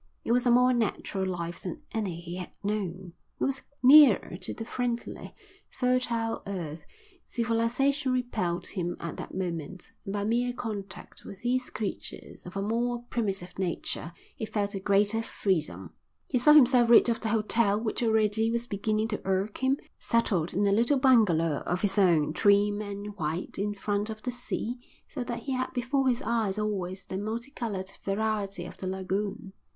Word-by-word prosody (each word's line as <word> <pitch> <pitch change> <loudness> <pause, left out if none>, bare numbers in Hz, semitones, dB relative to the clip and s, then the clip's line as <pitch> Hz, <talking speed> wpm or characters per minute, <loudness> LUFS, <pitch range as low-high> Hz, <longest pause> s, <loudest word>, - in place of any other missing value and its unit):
It - - -1
was 245 +1 +3
a - - +5
more 250 +1 +5
natural 205 -4 -1
life 170 -2 -4
than 180 - -6
any 195 -7 -2
he 175 +1 -7
had 180 - -6
known, 190 -4 -3 0.3
it - - -1
was 270 -1 0 0.2
nearer 265 - +7
to 180 - -4
the 225 - -6
friendly, 240 -1 -4 0.3
fertile 250 -3 0
earth; 170 -5 -5 0.4
civilisation 245 +4 +1
repelled 215 -9 -1
him 175 -3 -3
at 170 -2 -5
that - - -7
moment, 180 -1 -4
and 195 - -5
by 200 0 -1
mere 240 +3 +1
contact 210 -5 -6
with 195 0 -10
these 250 +1 0
creatures 210 -3 -6
of 180 - -7
a 195 - -1
more 240 +3 -1
primitive 195 -6 -2
nature 175 -2 -1 0.2
he 220 - -4
felt 205 -2 -1
a 195 - -3
greater 205 +3 +2
freedom. 120 - -2 0.3
He 250 - 0
saw 300 +5 +7
himself 250 -5 +6
rid 235 - +8
of 230 -1 0
the 220 - -1
hotel 215 -1 +2
which 220 +1 -2
already 220 -1 +2
was 235 +1 -1
beginning 215 +1 -1
to 210 - -3
irk 195 +2 -1
him, 265 +1 +3 0.2
settled 190 -8 0
in 200 +2 +2
a 200 - +3
little 235 +7 +3
bungalow 195 - +4
of 180 +3 -1
his 205 0 +2
own, 160 -6 +4
trim 205 +1 +3
and 205 0 -6
white, 160 +3 -3
in 205 +1 -1
front 205 +1 -1
of 215 -1 -7
the 250 - -2
sea 245 0 -3 0.3
so 260 - -4
that 240 -1 -5
he 275 - -4
had 255 0 -1
before 260 +2 0
his 250 +2 0
eyes 220 -4 0
always 195 -3 -3
the 190 - -4
multicoloured 220 -3 -4
variety 205 0 -1
of - - -10
the 190 - -5
lagoon. 190 +1 -3
210 Hz, 175 wpm, -28 LUFS, 190-235 Hz, 0.4 s, rid